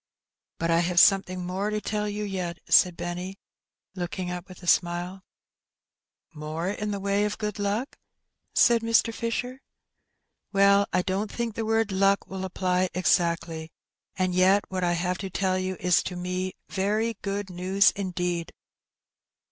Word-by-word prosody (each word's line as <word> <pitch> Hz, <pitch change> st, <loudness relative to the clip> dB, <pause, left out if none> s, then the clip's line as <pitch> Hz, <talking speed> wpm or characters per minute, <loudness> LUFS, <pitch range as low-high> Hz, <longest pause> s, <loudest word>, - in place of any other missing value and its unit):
"But 165 Hz, 0 st, 0 dB
I 165 Hz, -, +4 dB
have 175 Hz, 0 st, +2 dB
something 185 Hz, -2 st, +4 dB
more 190 Hz, +3 st, -2 dB
to 215 Hz, 0 st, -1 dB
tell 210 Hz, 0 st, -2 dB
you 210 Hz, +1 st, -3 dB
yet," 185 Hz, -4 st, -3 dB
said 180 Hz, -2 st, +5 dB
Benny, 180 Hz, +2 st, -5 dB, 0.6 s
looking 180 Hz, 0 st, -4 dB
up 180 Hz, +1 st, -6 dB
with 185 Hz, 0 st, -13 dB
a -, -, -8 dB
smile. 175 Hz, +2 st, +1 dB, 0.6 s
" -, -, -66 dB, 0.3 s
More 155 Hz, +4 st, -3 dB
in 210 Hz, 0 st, -4 dB
the 200 Hz, -1 st, -2 dB
way 200 Hz, +1 st, +1 dB
of 210 Hz, 0 st, -1 dB
good 210 Hz, -1 st, -4 dB
luck? 205 Hz, +6 st, -2 dB, 0.2 s
'* -, -, -49 dB
said 235 Hz, -2 st, +5 dB
Mr. 230 Hz, 0 st, +2 dB
Fisher. 245 Hz, +3 st, -3 dB, 0.4 s
" -, -, -53 dB
Well, 200 Hz, 0 st, +5 dB
I 180 Hz, -, +1 dB
don't 195 Hz, +3 st, -2 dB
think 235 Hz, -2 st, -3 dB
the 225 Hz, +1 st, -3 dB
word 225 Hz, -1 st, +1 dB
luck 195 Hz, +1 st, +2 dB
will 190 Hz, 0 st, -5 dB
apply 185 Hz, 0 st, 0 dB
exactly, 170 Hz, -3 st, 0 dB, 0.5 s
and 185 Hz, -1 st, 0 dB
yet 190 Hz, +3 st, +4 dB
what 185 Hz, -1 st, -2 dB
I 175 Hz, 0 st, +2 dB
have 180 Hz, +1 st, -1 dB
to 195 Hz, -, -4 dB
tell 185 Hz, 0 st, 0 dB
you 185 Hz, 0 st, -3 dB
is 180 Hz, 0 st, +3 dB
to 180 Hz, -, -5 dB
me 180 Hz, +1 st, -3 dB
very 210 Hz, +4 st, 0 dB
good 200 Hz, -1 st, -3 dB
news 185 Hz, +3 st, +3 dB
indeed." 180 Hz, -3 st, -3 dB
190 Hz, 165 wpm, -26 LUFS, 180-205 Hz, 0.6 s, said